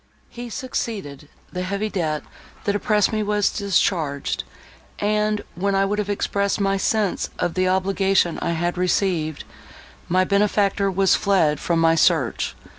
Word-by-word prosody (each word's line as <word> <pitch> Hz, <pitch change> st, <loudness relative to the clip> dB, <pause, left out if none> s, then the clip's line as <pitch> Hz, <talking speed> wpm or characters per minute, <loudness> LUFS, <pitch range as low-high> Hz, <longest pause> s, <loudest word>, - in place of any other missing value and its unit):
He 240 Hz, 0 st, -7 dB
succeeded; 205 Hz, -, -5 dB, 0.2 s
the 180 Hz, -, -3 dB
heavy 200 Hz, +3 st, -2 dB
debt, 160 Hz, -7 st, -2 dB, 0.4 s
that 205 Hz, -, 0 dB
oppressed 210 Hz, -1 st, +2 dB
me, 215 Hz, -, 0 dB
was 210 Hz, -1 st, +1 dB
discharged; 170 Hz, -7 st, 0 dB, 0.5 s
and, 210 Hz, 0 st, 0 dB
when 195 Hz, +2 st, -1 dB
I 195 Hz, 0 st, +3 dB
would 205 Hz, +2 st, -1 dB
have 205 Hz, -1 st, -2 dB
expressed 200 Hz, 0 st, 0 dB
my 195 Hz, -1 st, +1 dB
sense 205 Hz, 0 st, 0 dB
of 175 Hz, -1 st, -1 dB
the 185 Hz, 0 st, +1 dB
obligation 190 Hz, -1 st, +1 dB
I 170 Hz, -, 0 dB
had 175 Hz, +2 st, -1 dB
received, 175 Hz, -4 st, 0 dB, 0.7 s
my 185 Hz, +2 st, +3 dB
benefactor 200 Hz, 0 st, +2 dB
was 195 Hz, 0 st, +3 dB
fled 170 Hz, -7 st, +2 dB
from 170 Hz, -, 0 dB
my 165 Hz, 0 st, +4 dB
search. 160 Hz, -6 st, +1 dB
195 Hz, 145 wpm, -22 LUFS, 175-205 Hz, 0.7 s, my